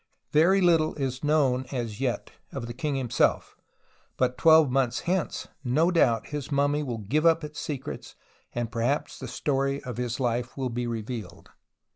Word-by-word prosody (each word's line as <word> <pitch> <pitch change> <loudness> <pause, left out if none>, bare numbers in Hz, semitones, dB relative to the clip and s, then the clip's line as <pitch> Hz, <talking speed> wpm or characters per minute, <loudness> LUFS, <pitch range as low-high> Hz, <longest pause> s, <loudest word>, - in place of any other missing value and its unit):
Very 180 +6 +4
httle 165 -3 +3
is 130 -1 -2
known 135 -4 +2
as 120 -3 -4
yet 125 -3 -2 0.2
of 135 -4 -5
the 120 - -6
king 140 +3 -2
himself, 125 -4 +1 0.6
but 125 -1 +1
twelve 160 -2 +6
months 125 -2 +1
hence 180 -1 -1 0.2
no 155 +8 +2
doubt 120 -10 +2
his 145 -1 -5
mummy 145 +1 +2
will 125 -6 -3
give 125 +9 0
up 165 -1 +4
its 150 0 -6
secrets 140 -4 -6 0.4
and 120 -1 -3
perhaps 120 +5 -1
the - - -6
story 140 -1 -1
of 125 -3 -6
his 120 0 -2
life 120 0 -1
will 130 -2 -1
be 120 +1 -2
revealed. 110 -5 -6
135 Hz, 165 wpm, -27 LUFS, 120-150 Hz, 0.6 s, twelve